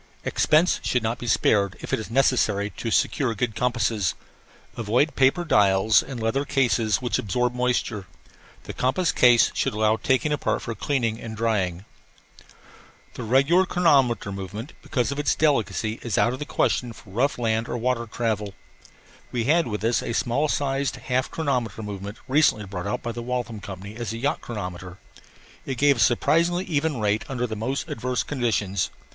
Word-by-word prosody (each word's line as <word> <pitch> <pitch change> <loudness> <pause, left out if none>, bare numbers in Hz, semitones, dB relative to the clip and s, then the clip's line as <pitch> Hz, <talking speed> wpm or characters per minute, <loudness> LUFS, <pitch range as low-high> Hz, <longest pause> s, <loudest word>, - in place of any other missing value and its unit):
Expense 160 +4 +3
should 125 -2 0
not 115 +2 -2
be 120 - -6
spared 100 -4 +2
if - - -7
it - - +2
is 110 - -7
necessary 110 -5 +2
to 115 - -5
secure 115 +2 +1
good 110 +2 -1
compasses. 115 -6 0 0.6
Avoid 120 +7 +1
paper 135 +6 +3
dials 100 -5 +4
and 130 -3 -7
leather 115 +5 0
cases 125 -5 +1
which 120 - 0
absorb 125 +4 0
moisture. 125 -5 -1 0.6
The - - -7
compass 135 +8 +1
case 120 -2 +5
should - - -1
allow 110 +1 +2
taking 130 +6 +1
apart 145 - -1
for 115 - -4
cleaning 115 -3 -1
and 110 -1 -7
drying. 100 -5 -1 1.3
The - - -7
regular 140 +11 +3
chronometer 135 - +2
movement, 100 +6 -7
because 130 -3 -1
of 140 - -4
its 145 - +1
delicacy, 115 -6 0
is 115 -5 -2
out 120 - +3
of 130 - -6
the 150 - -4
question 120 -4 0
for 105 - -15
rough 130 +8 0
land 115 -1 0
or - - -2
water 120 0 -1
travel. 105 -3 -2 0.8
We 120 -2 -1
had 160 +6 +3
with 105 -2 -4
us 115 +1 +2
a - - -4
small 125 +6 +1
sized 140 -1 -1
half 130 0 -1
chronometer 125 -9 -2
movement 100 0 -6
recently 130 -6 +3
brought 95 -1 -5
out 125 +5 -3
by 120 - -3
the 120 +1 -6
Waltham 120 -2 -3
Company 100 +1 -8
as 120 -3 -4
a - - -5
yacht 140 +5 -1
chronometer. 90 -4 -6 0.7
It 130 - -3
gave 140 +1 +4
a - - -5
surprisingly 170 - +2
even 150 -4 -1
rate 105 0 +1
under 125 -2 -1
the 110 -2 -4
most 125 +6 -3
adverse 125 +2 -2
conditions. 105 -8 -1
120 Hz, 175 wpm, -24 LUFS, 105-135 Hz, 1.3 s, case